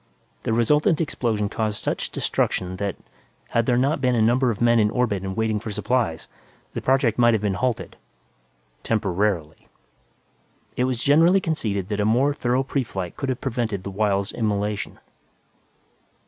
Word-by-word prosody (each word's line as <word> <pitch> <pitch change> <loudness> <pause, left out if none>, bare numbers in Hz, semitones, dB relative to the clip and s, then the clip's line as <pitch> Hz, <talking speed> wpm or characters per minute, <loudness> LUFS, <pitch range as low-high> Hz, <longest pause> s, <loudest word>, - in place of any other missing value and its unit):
The - - -2
resultant 150 - +3
explosion 115 -9 -1
caused 110 0 -2
such - - -2
destruction 95 0 -1
that, 100 -1 -2 0.5
had 115 0 +1
there 120 - +3
not 140 +5 +1
been 125 -2 +2
a - - +2
number 125 +3 +3
of 110 - -2
men 120 0 +4
in 105 -1 +3
orbit 110 -5 0
and 95 +1 -5
waiting 110 -1 0
for 110 - -7
supplies, 105 -4 -1 0.5
the - - -4
project 130 -4 +2
might 120 -1 +5
have 105 - -1
been 100 -2 +1
halted, 120 +4 -2 0.8
"temporarily." 95 -6 -1 1.1
It 125 - +1
was 125 -2 -2
generally 165 +7 +5
conceded 105 - -2
that 105 -1 -2
a 105 - +2
more 130 +7 +3
thorough 130 -1 0
preflight 105 -10 -3
could 135 - -3
have 130 - -2
prevented 115 -7 -2
the 100 - -5
Wyld's 100 0 0
immolation. 105 -2 -2
110 Hz, 160 wpm, -23 LUFS, 100-125 Hz, 1.1 s, might